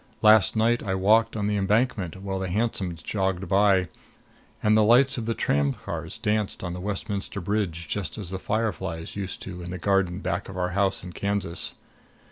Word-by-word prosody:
Last 110 -1 +6
night 115 +2 +2
I 95 -2 -2
walked 110 +5 +3
on 105 - -1
the 105 0 +1
Embankment 100 -3 0
while 95 -1 -2
the 95 -1 -3
hansoms 95 -5 -1
jogged 95 -2 -1
by 95 -1 +4 0.8
and 110 0 +4
the 110 - +5
lights 125 +4 +5
of 115 - -5
the 115 - 0
tramcars 70 0 -1
danced 105 -2 -1
on 90 -2 -3
Westminster 100 0 -3
Bridge 90 -4 -2
just 90 0 -3
as 95 -4 -6
the 95 - -3
fireflies 95 -7 -2
used 95 -2 -5
to 90 -2 -7
in 85 - -7
the 90 - -4
garden 95 -1 +1
back 100 - -3
of 95 - -7
our 90 0 0
house 100 0 +1
in 90 -1 -8
Kansas. 100 -3 -1
100 Hz, 180 wpm, -26 LUFS, 90-105 Hz, 0.8 s, Last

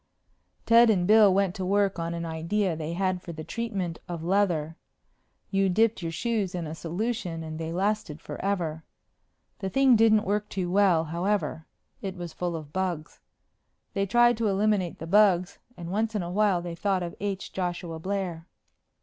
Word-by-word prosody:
Ted 230 0 +6
and 185 -5 +3
Bill 210 0 +7
went 190 -1 +2
to 190 - -5
work 195 -1 +1
on 165 0 -2
an 170 0 -4
idea 165 +3 -1
they 155 +1 -4
had 185 0 -1
for 170 - -8
the 155 0 -7
treatment 195 -6 -3
of 170 -2 -5
leather. 170 -4 +1 0.8
You 195 -1 +2
dipped 220 +3 +2
your 165 -1 -3
shoes 205 0 -1
in 175 -2 -3
a 155 - -5
solution 175 0 -3
and 155 0 -6
they 160 0 -4
lasted 190 -4 -1
forever. 165 -4 -3 0.8
The 195 - -3
thing 270 +3 +5
didn't 220 -1 +5
work 210 +1 -1
too 180 -2 -3
well, 190 -4 +4
however. 170 0 -2 0.3
It 190 -1 -4
was 175 -2 -7
full 175 -1 -3
of 150 -2 -8
bugs. 180 -5 -3 0.7
They 195 0 0
tried 240 +3 +4
to 225 -1 0
eliminate 200 -3 +1
the 160 - -7
bugs 185 -1 +3 0.2
and 170 0 -6
once 220 +2 -1
in 200 - 0
a 175 - -5
while 195 -3 +2
they 175 -1 -5
thought 190 +1 0
of 170 - -5
H. 195 -1 -4
Joshua 175 -3 -3
Blair. 185 -2 -3
185 Hz, 175 wpm, -27 LUFS, 170-205 Hz, 0.8 s, Bill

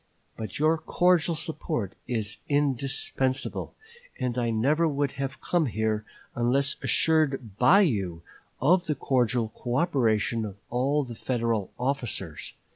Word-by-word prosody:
But 110 -3 -5
your 155 +2 +3
cordial 175 0 +2
support 155 - -2
is 110 -3 -2
indispensable, 135 -2 0 0.4
and 125 -2 -1
I 120 -2 0
never 140 +9 +2
would 145 -2 0
have 140 +2 -4
come 170 -4 +1
here, 110 -1 -1 0.3
unless 135 +4 +1
assured 135 -9 +1
by 175 +12 +7
you 95 - 0 0.4
of 175 +7 +3
the 150 - 0
cordial 120 -4 +1
coöperation 120 -5 +1
of 100 -2 -6
all 135 +4 +1
the 120 -3 -7
Federal 115 -4 -1
officers.... 120 - -3
130 Hz, 120 wpm, -27 LUFS, 115-150 Hz, 0.4 s, by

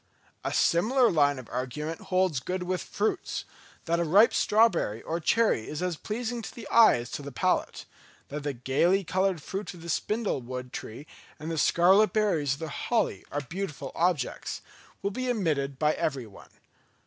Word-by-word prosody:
A - - -2
similar 235 +8 +3
line 145 -4 +3
of 130 -3 -9
argument 150 +6 -4
holds 185 -6 +1
good 180 +7 -3
with 180 0 -2
fruits; 210 +2 -2 0.4
that 170 0 +1
a - - +2
ripe 195 +8 +5
strawberry 200 - +2
or 165 +1 -2
cherry 210 - +2
is 155 +4 -4
as 180 -2 -1
pleasing 235 +6 -4
to - - -9
the 235 - -8
eye 230 -1 +7
as 120 0 -5
to - - -4
the 140 0 -7
palate—that 140 +3 -3
the 145 0 -2
gaily 140 +10 +2
coloured 185 -3 0
fruit 195 +2 -5
of 165 - -12
the 170 - -7
spindle 210 - -1
wood 125 +1 -7
tree 120 +7 -7 0.3
and 155 +2 -6
the 165 - -3
scarlet 190 +8 +4
berries 175 -11 +1
of 140 - -7
the 160 - -4
holly 235 +10 -1
are 145 - -2
beautiful 145 -2 -5
objects—will 175 +4 -3
be 255 +4 -3
admitted 150 - 0
by 150 +2 +2
everyone. 125 -9 -4
170 Hz, 170 wpm, -28 LUFS, 140-200 Hz, 0.4 s, eye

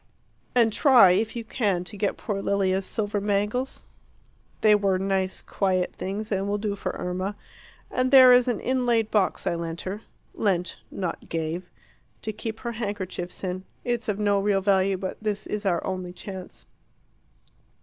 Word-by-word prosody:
And 230 -3 +4
try, 245 - +7
if 215 +6 +1
you 235 - -3
can, 205 -6 0
to 180 - -7
get 205 0 -1
poor 200 -3 -3
Lilia's 195 -1 +1
silver 205 -1 -1
bangles. 210 +6 -1 0.8
They 215 -1 +6
were 200 -2 +3
nice 190 0 -1
quiet 185 -2 0
things, 210 +3 -4
and 195 0 0
will 205 +1 0
do 205 -1 -2
for - - -4
Irma. 185 +3 -3 0.6
And 255 0 +1
there 260 -2 +9
is 245 0 +5
an 240 -4 0
inlaid 240 -4 +1
box 205 -3 +1
I - - +1
lent 170 0 -4
her 200 +3 -5 0.3
lent, 180 -4 0
not 180 -4 -5
gave 165 +2 -3 0.5
to 215 - -3
keep 220 +1 -6
her 235 - -3
handkerchiefs 200 -6 -5
in. 185 0 -3 0.2
It's 240 -2 -2
of 205 - 0
no 205 -1 +2
real 200 0 +2
value; 195 -1 +2
but 185 0 -4
this 210 -1 -2
is 210 -1 -3
our 175 -3 +1
only 185 -1 -4
chance. 190 -1 -9
200 Hz, 165 wpm, -26 LUFS, 185-220 Hz, 0.8 s, there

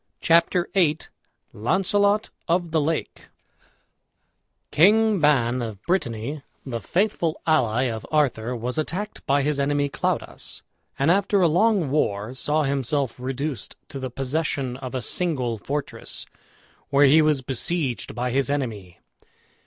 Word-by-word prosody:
CHAPTER 170 +1 +3
VIII 165 -6 +3 0.6
LAUNCELOT 200 - +1 0.2
OF 170 0 +1
THE 160 -1 +2
LAKE 160 +2 -3 1.4
King 210 +6 +5
Ban, 130 -5 +3
of 110 -4 -5
Brittany, 140 - -2 0.2
the 120 -4 -4
faithful 175 - 0
ally 125 -7 +2
of 115 -4 -3
Arthur 125 -6 +1
was 125 +5 -3
attacked 185 +7 -4
by 140 0 +3
his 145 0 0
enemy 145 0 +1
Claudas, - - -3 0.3
and 140 +4 +3
after 200 +1 +2
a 175 - +5
long 180 -2 +2
war 105 -6 0
saw 150 +4 +1
himself 140 -2 -1
reduced 135 -1 -4
to 135 - -6
the 130 -1 -4
possession 135 0 -2
of 130 -1 -7
a 125 - -2
single 125 -7 -1
fortress, 145 +5 -4 0.6
where 140 +1 +5
he 150 +4 +6
was 150 -3 +2
besieged 135 +1 -2
by 125 +1 -1
his 135 +2 +1
enemy. 110 -11 -3
145 Hz, 130 wpm, -24 LUFS, 125-165 Hz, 1.4 s, he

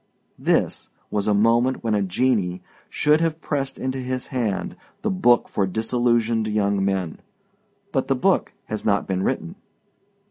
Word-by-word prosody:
This - - 0 0.2
was 105 -1 -1
a 105 - +4
moment 115 +5 +3
when 115 -2 0
a 105 - +2
genii 95 -2 0 0.3
should 150 +2 +3
have 165 -1 0
pressed 135 -4 -3
into 130 0 -3
his 130 0 -3
hand 110 -7 -1 0.3
the 220 - +1
book 120 -11 +3
for 100 - 0
disillusioned 115 +1 +1
young 100 -2 +1
men. 95 -4 -1 0.7
But 135 -5 0
the 135 - +2
book 185 +9 +2
has 110 -1 -4
not 100 -2 +2
been 95 -1 -1
written. 170 - -2
115 Hz, 150 wpm, -23 LUFS, 100-130 Hz, 0.7 s, a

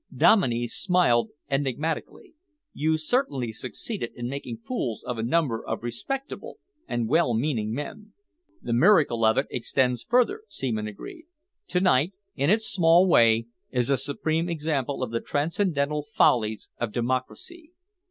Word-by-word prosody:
Dominey 120 - +4
smiled 145 -3 +2 0.2
enigmatically. 145 +3 -3 0.4
"You 160 +2 +1
certainly 155 - -1
succeeded 125 - -5
in 120 0 -4
making 130 -4 -5
fools 125 - -3
of 125 -2 -4
a - - 0
number 125 -1 0
of - - -4
respectable 265 - -5 0.3
and 120 -2 -1
well 140 -3 +2
meaning 115 -4 -1
men." 175 - -6 0.5
"The 120 - -2
miracle 145 - +4
of 110 0 +4
it 135 - +2
extends 125 0 0
further," 250 - +2
Seaman 110 - -3
agreed. 305 - -10 0.4
"To 180 - 0
night, 175 -1 +3 0.2
in 140 +2 +1
its 220 +3 +3
small 175 -2 +4
way, 115 -7 +5 0.2
is 125 0 0
a - - +5
supreme 155 +5 -1
example 145 -5 -2
of 120 - -4
the 115 - -1
transcendental 150 -2 0
follies 110 -7 +1
of 120 -2 -2
democracy. 130 - -3
140 Hz, 140 wpm, -26 LUFS, 120-170 Hz, 0.5 s, way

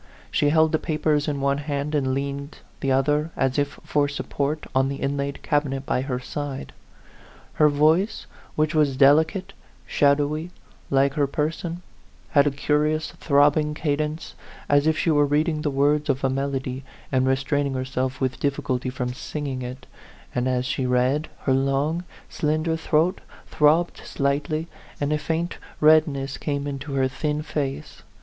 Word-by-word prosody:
She 145 - +2
held 160 +1 +4
the 155 - +2
papers 150 -1 0
in 145 -2 -2
one 140 +1 +1
hand, 145 0 -3
and 135 -3 +1
leaned 140 +1 -4 0.2
the 135 - 0
other, 150 +4 +2
as 135 +1 +1
if 145 0 -2
for 145 -1 +1
support, 145 +1 -3
on 135 +1 +2
the 140 - -3
inlaid 140 0 -3
cabinet 140 -2 0
by 130 -4 0
her 130 -2 -2
side. 140 +1 -5 0.9
Her 150 - +7
voice, 155 +8 +2 0.3
which 155 +1 +1
was 145 -4 +2
delicate, 155 +7 +4 0.3
shadowy, 145 +3 +1 0.4
like 135 0 +3
her 145 -2 +1
person, 165 +4 -3 0.5
had 145 -1 +5
a - - +5
curious 150 +2 0
throbbing 150 +1 +2
cadence, 150 +1 -2 0.3
as 145 +1 +3
if 160 0 +2
she 165 - +1
were 145 -1 +4
reading 155 +2 +1
the 150 - 0
words 145 +2 +1
of 135 -1 0
a 135 - +2
melody, 135 -1 -2 0.3
and 130 0 +2
restraining 135 +1 0
herself 130 0 -2
with 130 -1 -1
difficulty 130 -2 -1
from 125 -1 -3
singing 135 0 -4
it; 125 +1 -7 0.5
and 125 +1 0
as 125 0 0
she 130 0 -1
read, 125 +5 +1
her 135 - +1
long, 140 +6 0 0.2
slender 155 +2 0
throat 160 +3 +1 0.2
throbbed 155 +4 +3
slightly, 145 +3 -1 0.3
and 145 +1 0
a 150 - 0
faint 165 +3 -2 0.2
redness 150 -3 +3
came 140 -2 -2
into 140 0 -5
her 135 -1 +2
thin 150 +3 -2
face. 140 -3 -4
145 Hz, 155 wpm, -24 LUFS, 135-150 Hz, 0.9 s, Her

